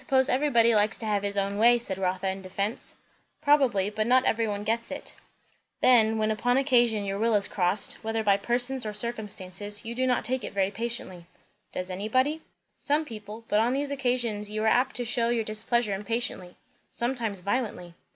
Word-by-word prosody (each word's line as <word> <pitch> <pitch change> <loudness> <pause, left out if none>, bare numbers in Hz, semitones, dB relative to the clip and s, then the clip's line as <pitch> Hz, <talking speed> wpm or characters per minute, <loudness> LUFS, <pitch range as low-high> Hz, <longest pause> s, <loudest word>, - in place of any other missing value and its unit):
How - - -14
is - - -21
that?" 270 - +1
"I - - +7
suppose 260 0 +3
everybody 245 -4 +4
likes 210 +1 +2
to 225 - -7
have 205 -2 0
his 200 0 -2
own 200 +1 -1
way," 240 +2 +6
said 195 -5 -3
Rotha 185 0 -1
in 190 0 -3
defence. 200 +4 -4 0.4
"Probably; 260 -10 +3
but 215 +1 -1
not 255 +1 +4
every 225 0 +1
one 205 -1 -3
gets 230 +2 -1
it. 285 - -7 0.7
Then, 225 -3 +5
when 215 0 +1
upon 245 +3 +1
occasion 240 -6 +2
your 195 0 -3
will 225 0 +2
is 200 -1 +2
crossed, 185 +2 0
whether 225 0 -2
by 200 -2 +4
persons 245 +5 -1
or 215 -1 -4
circumstances, 205 -2 -4
you 230 - -4
do 255 +2 0
not 250 -1 +1
take 260 +1 -1
it - - -6
very 195 0 +1
patiently." 205 -6 -5 0.4
"Does 185 +1 -4
anybody?" 255 +11 0 0.4
"Some 295 +2 0
people. 215 -2 -9
But 210 - +2
on 235 +3 +2
these 280 +1 -2
occasions 245 -6 -1
you 215 +1 -3
are - - +2
apt 250 +4 +2
to 245 - -2
shew 235 0 +1
your 235 -1 +1
displeasure 215 +1 0
impatiently 200 -3 -3 0.3
sometimes 235 -5 -2
violently." 200 -4 -3
220 Hz, 200 wpm, -27 LUFS, 205-245 Hz, 0.7 s, I